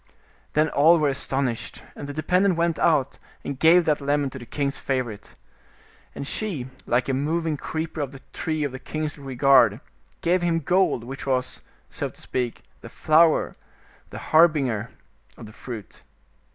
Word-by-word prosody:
Then 155 +1 +2
all 160 +5 +5
were 150 -3 +2
astonished, 135 -3 -1
and 140 - -7
the - - -5
dependent 180 +5 +2
went 170 -1 0
out, 145 -5 +2 0.3
and 140 -2 -5
gave 170 +2 +6
that 150 -2 +1
lemon 140 -1 0
to 135 - -8
the 120 - -11
king's 140 -1 -2
favorite. 125 -6 -4 0.8
And - - -5
she, 160 - -3 0.2
like 120 +1 +1
a 135 - 0
moving 155 +4 -1
creeper 160 +2 -4
of 140 -2 -3
the 135 -1 -12
tree 155 -2 -2
of 145 - -2
the 130 - -7
king's 155 +1 -4
regard, 135 0 +4 0.4
gave 180 +2 +2
him 170 -1 +1
gold, 175 -5 +1
which 135 +3 -8
was, 130 -1 -1 0.3
so - - -3
to - - -12
speak, 125 -2 -3 0.2
the - - -10
flower, 160 +1 +3 0.6
the - - -8 0.2
harbinger 140 -9 +4 0.5
of - - -10
the 110 - -12
fruit. 115 -4 -9
145 Hz, 165 wpm, -24 LUFS, 130-160 Hz, 0.8 s, gave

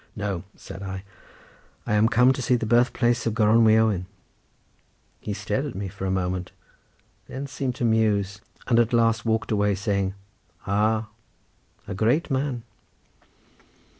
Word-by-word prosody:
"No," 100 -4 -3
said 95 - -10
I; 95 -1 -5 0.8
"I - - -1
am 105 +2 +4
come 125 0 +5
to 130 - -5
see 125 0 +2
the 115 - -1
birth 120 +3 +3
place 120 -1 +1
of 110 - -1
Gronwy 110 0 +5
Owen;" 105 -5 +1 1.1
he 105 - -5
stared 105 +7 -2
at 135 - -7
me 95 0 -4
for 95 +1 -5
a - - -1
moment, 90 -1 -2 0.8
then 135 +2 -5
seemed 135 -2 -3
to 125 - -1
muse, 105 -3 +1 0.2
and 115 -2 +3
at 120 0 +2
last 115 -1 +2
walked 110 0 0
away 105 -1 +2
saying 100 -1 -1 0.5
"Ah! 110 +2 +1 0.8
a - - -4
great 120 - +1
man." 130 -3 -1
110 Hz, 150 wpm, -25 LUFS, 100-120 Hz, 1.1 s, come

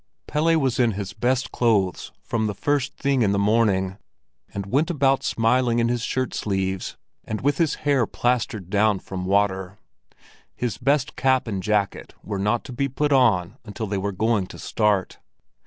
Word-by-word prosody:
Pelle 165 +2 +2
was 130 -4 0
in 120 -3 +3
his 100 0 -5
best 125 +5 0
clothes 105 -7 +1
from 110 -2 -1
the 105 - -3
first 145 +5 -1
thing 135 -2 +1
in 100 -3 +3
the - - +1
morning, 100 -2 +1 0.5
and 100 -1 -5
went 140 - +1
about 135 -5 +2
smiling 120 +1 +1
in 115 0 +2
his 120 -1 -1
shirt 130 +2 -2
sleeves 95 -2 -2 0.3
and 110 -1 -4
with 145 +1 +1
his 165 -4 +2
hair 135 -6 +3
plastered 110 -6 -1
down 105 -1 +3
with - - -17
water; 95 0 0 0.8
his 120 -4 -3
best 140 -1 +1
cap 130 0 +2
and 100 -4 -3
jacket 100 0 -1
were 100 -2 -4
not 105 +4 0
to 130 - -9
be 140 +3 -1
put 145 +2 0
on 110 -10 +2
until 110 0 -5
they 100 -1 -2
were 100 +1 -2
going 105 0 0
to - - -11
start. 105 -4 0
110 Hz, 175 wpm, -23 LUFS, 100-130 Hz, 0.8 s, in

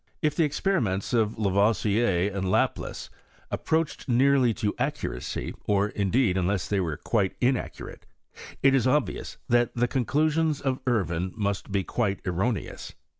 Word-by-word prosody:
If 150 -1 +1
the 165 - +3
ex 145 -1 -3
leriments 115 - 0
of 110 -2 +1
Lavoisier 105 -1 +2
and 95 -1 -2
Laplace - - -1 0.4
approached 160 0 -1
learly 130 0 +4
to 105 -3 0
accuracy, - - -3
or, 100 0 +2
indeed, 100 0 +1
unless 95 -1 0
they 100 - 0
were 80 -5 -2
[uite 100 -5 +1
inaccurate, 125 0 -2 0.6
it 135 0 +6
is 130 -2 +3
obvious 145 +1 0
that 120 0 +2
the 120 0 +2
conclusions 150 +4 +1
ti 130 -2 0
Irvine 95 -6 0
must 100 -1 -2
be 100 -1 +1
quite 100 -2 -1
erroneous. 95 +6 -2
110 Hz, 140 wpm, -26 LUFS, 100-130 Hz, 0.6 s, it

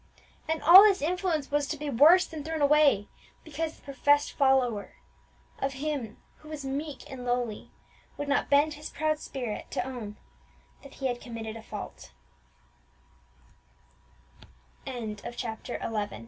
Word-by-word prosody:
And 320 -1 -2
all 345 +6 +11
this 410 -2 +5
influence 325 -2 -1
was 290 0 +1
to 305 - -3
be 300 +1 -5
worse 305 +8 +6
than 310 -3 -8
thrown 315 -1 -2
away, 285 -8 +4 0.4
because 320 +1 -4
the - - -24
professed 290 +1 +2
follower 250 -8 +1 0.6
of 270 0 -1
Him 270 -5 -4 0.2
who 310 - -15
was 300 -3 -6
meek 280 +1 -4
and 265 -3 -8
lowly 245 -3 -2 0.5
would 290 - -4
not 285 - +1
bend 290 +2 +4
his 300 +1 -8
proud 310 0 -1
spirit 245 -8 -5
to - - -2
own 225 -5 -7 0.6
that 275 - -14
he 270 - -6
had 245 -2 -1
committed 225 -2 -7
a 225 - -8
fault! - - -9 2.7
CHAPTER 235 0 -5
XII. 210 -2 -3
280 Hz, 140 wpm, -28 LUFS, 240-305 Hz, 2.7 s, all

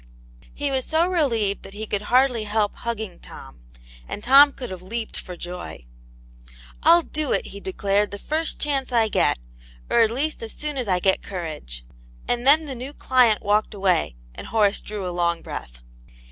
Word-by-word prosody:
He 285 -1 -1
was 265 -1 0
so 325 +2 +3
relieved 235 - +1
that 195 - -11
he 215 +1 -4
could 205 -1 -2
hardly 245 0 +2
help 210 0 0
hugging 220 -5 -4
Tom; 65 -2 -12 0.5
and 210 - -6
Tom 280 +3 +8
could 250 -5 -7
have 185 -1 -7
leaped 220 +4 -5
for 180 -2 -7
joy, 175 - -7 1.0
"I'll 335 +2 +6
do 305 -3 -2
it," - - 0
he 200 - -7
declared, 200 +1 0
"the 200 - -6
first 315 +9 -2
chance 275 -3 -1
I 230 -2 +3
get. - - +2 0.5
Or - - +4
at 225 - +5
least 285 +7 -2
as 225 -1 -6
soon 300 -2 -4
as 245 - -3
I 185 -2 +2
get 190 +1 +2
courage." 155 - -6 0.4
And 245 +1 -1
then 310 +3 +6
the 280 - -5
new 255 +3 -7
client 250 -7 +3
walked 210 +1 +1
away, 185 - +1 0.2
and - - -9
Horace 210 -2 +2
drew 205 -3 -5
a - - -3
long 170 -1 0
breath. - - -8
220 Hz, 185 wpm, -23 LUFS, 190-265 Hz, 1.0 s, Tom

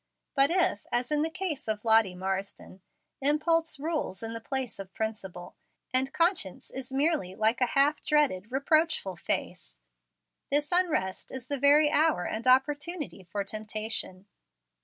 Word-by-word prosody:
But 275 -1 +4
if, 340 - +1
as 245 +3 0
in 300 0 +2
the 320 - 0
case 325 -7 -4
of 215 0 -2
Lottie 220 -4 +4
Marsden, 190 0 -4 0.4
impulse 310 +3 +2
rules 305 - -3
in 225 0 -4
the 230 - -6
place 260 -2 -4
of 190 -1 -9
principle, 195 -5 -5 0.4
and 260 +1 +2
conscience 335 - 0
is 265 0 -7
merely 275 - 0
like 220 +4 +1
a 250 - +4
half 290 +2 +3
dreaded, 275 -10 +1
reproachful 280 - +1
face, - - -3 0.7
this 295 +1 +1
unrest 335 - 0
is 260 -3 -6
the 285 +1 -3
very 295 +2 +5
hour 310 - +2
and 225 +3 -4
opportunity 290 - +1
for 200 +4 -3
temptation. 215 -2 -5
260 Hz, 145 wpm, -28 LUFS, 205-300 Hz, 0.7 s, very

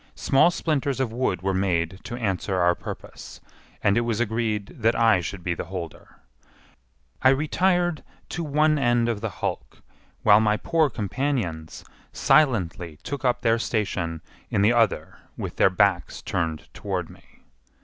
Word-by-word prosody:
Small 135 +5 +4
splinters 145 -6 -1
of 125 -4 -1
wood 105 -8 -1
were 95 0 0
made 95 -1 0
to 120 - -5
answer 100 -4 -2
our 90 -1 +4
purpose, - - -9 0.4
and 100 +2 +3
it - - +3
was 115 -2 -1
agreed 110 -3 -2
that 115 +1 +3
I 110 -6 +4
should 90 +2 -6
be 90 - 0
the - - -5
holder. 90 -4 -8 1.1
I 130 - +6
retired 175 +4 +1 0.3
to 175 - -3
one 150 0 +2
end 120 -2 +2
of 115 -3 -2
the 110 - -2
hulk, 95 - -5 0.4
while 105 0 +6
my 105 -1 +2
poor 160 +5 +1
companions 105 - -3 0.3
silently 90 - +2
took 140 -1 -5
up 125 -2 +1
their 115 -1 +2
station 90 -8 -2 0.3
in 100 - +1
the 110 +4 +5
other 115 -4 +1 0.2
with - - -6
their - - +5
backs 90 -3 +1
turned 80 -2 -2
toward - - -3
me. - - -19
110 Hz, 155 wpm, -24 LUFS, 95-130 Hz, 1.1 s, I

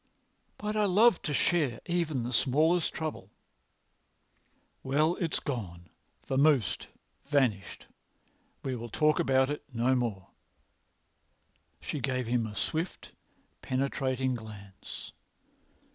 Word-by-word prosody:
"But 210 +1 -3
I 210 -1 +3
love 205 +2 +5
to 150 - -3
share 145 -4 +1
even 170 -7 0
the 120 +2 -3
smallest 155 +8 +3
trouble." 155 -1 -5 1.5
"Well, 150 +6 +2
it's 170 -3 -1
gone—vamosed—vanished. 125 - -1 0.8
We 130 -1 -2
will 120 0 -6
talk 155 +6 +2
about 130 +1 +3
it 145 - -4
no 120 +2 +2
more." 115 -7 -2 1.5
She 150 - -4
gave 130 -1 -1
him 115 -1 0
a 105 - -8
swift, 165 - -3 0.5
penetrating 130 0 0
glance. 105 -4 -9
130 Hz, 100 wpm, -30 LUFS, 120-155 Hz, 1.5 s, love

